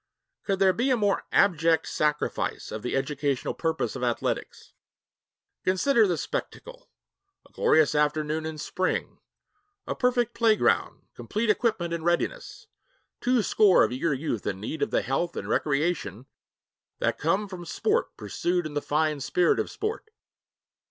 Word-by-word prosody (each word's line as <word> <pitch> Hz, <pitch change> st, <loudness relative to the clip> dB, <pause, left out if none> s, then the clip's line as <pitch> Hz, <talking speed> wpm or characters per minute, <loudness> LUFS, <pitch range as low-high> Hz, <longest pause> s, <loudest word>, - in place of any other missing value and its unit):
Could 195 Hz, -1 st, 0 dB
there 190 Hz, -1 st, +4 dB
be 245 Hz, +6 st, 0 dB
a 255 Hz, -, +3 dB
more 205 Hz, -3 st, +1 dB
abject 165 Hz, -4 st, +3 dB
sacrifice 150 Hz, 0 st, -1 dB
of 110 Hz, -, -5 dB
the 125 Hz, -, -3 dB
educational 140 Hz, 0 st, -1 dB
purposes 160 Hz, -8 st, -2 dB
of -, -, -5 dB
athletics? 120 Hz, -1 st, -3 dB, 0.9 s
Consider 215 Hz, +5 st, +3 dB
the 175 Hz, -3 st, 0 dB
spectacle. -, -, -6 dB, 0.6 s
A -, -, -31 dB
glorious 155 Hz, -2 st, +3 dB
afternoon 150 Hz, +1 st, 0 dB
in 160 Hz, -1 st, -6 dB
spring, 185 Hz, +4 st, -2 dB, 0.7 s
a -, -, -2 dB
perfect 245 Hz, -1 st, +1 dB
playground, 225 Hz, -2 st, +2 dB
complete 215 Hz, +1 st, -1 dB
equipment 210 Hz, -7 st, 0 dB
in 165 Hz, -1 st, -3 dB
readiness, 175 Hz, -, -2 dB, 0.5 s
two 250 Hz, -2 st, +2 dB
score 200 Hz, -3 st, +5 dB
of -, -, +1 dB
eager 135 Hz, +6 st, -1 dB
youth 130 Hz, -6 st, -3 dB
in 95 Hz, -2 st, -2 dB
need 110 Hz, +10 st, -5 dB
of -, -, +1 dB
the -, -, +1 dB
health 165 Hz, +6 st, -2 dB
and -, -, -4 dB
recreation 140 Hz, -, -1 dB, 0.7 s
that -, -, -1 dB
come 190 Hz, +7 st, +1 dB
from 185 Hz, -3 st, -8 dB
sport 430 Hz, -, -1 dB
pursued 175 Hz, -1 st, -1 dB
in 155 Hz, -, -5 dB
the 145 Hz, -, -1 dB
fine 155 Hz, 0 st, 0 dB
spirit 175 Hz, +5 st, +2 dB
of -, -, -1 dB
sport. 435 Hz, +1 st, -4 dB
170 Hz, 145 wpm, -26 LUFS, 150-210 Hz, 0.9 s, score